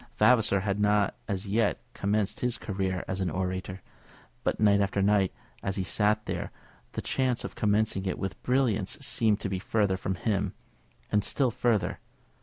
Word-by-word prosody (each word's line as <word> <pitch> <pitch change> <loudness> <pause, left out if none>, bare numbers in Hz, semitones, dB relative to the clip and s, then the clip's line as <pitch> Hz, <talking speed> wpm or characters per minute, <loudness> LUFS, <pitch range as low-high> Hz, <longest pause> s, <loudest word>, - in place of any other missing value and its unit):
Vavasor 110 -6 +4
had 100 0 -1
not 105 -1 +2
as 100 -1 -2
yet 105 +2 +1
commenced 100 0 0
his 125 -1 0
career 95 -3 -2
as 95 +1 -3
an 95 - 0
orator; 95 +2 -3 0.6
but - - 0
night 100 -1 +5
after 100 0 0
night, 100 -1 +3 0.3
as 95 - -2
he 95 - -1
sat 105 +3 +2
there, - - -3 0.4
the - - -4
chance 130 -2 0
of - - -5
commencing 105 -2 +1
it 95 - -1
with 95 -1 -5
brilliance 120 -7 +1
seemed 110 -6 +2
to - - -1
be 95 -1 -2
further 100 -1 +1
from 95 0 -2
him, 100 0 -1 0.6
and 105 -1 +3
still 130 +1 +2
further. 115 -6 0
100 Hz, 170 wpm, -28 LUFS, 95-110 Hz, 0.6 s, night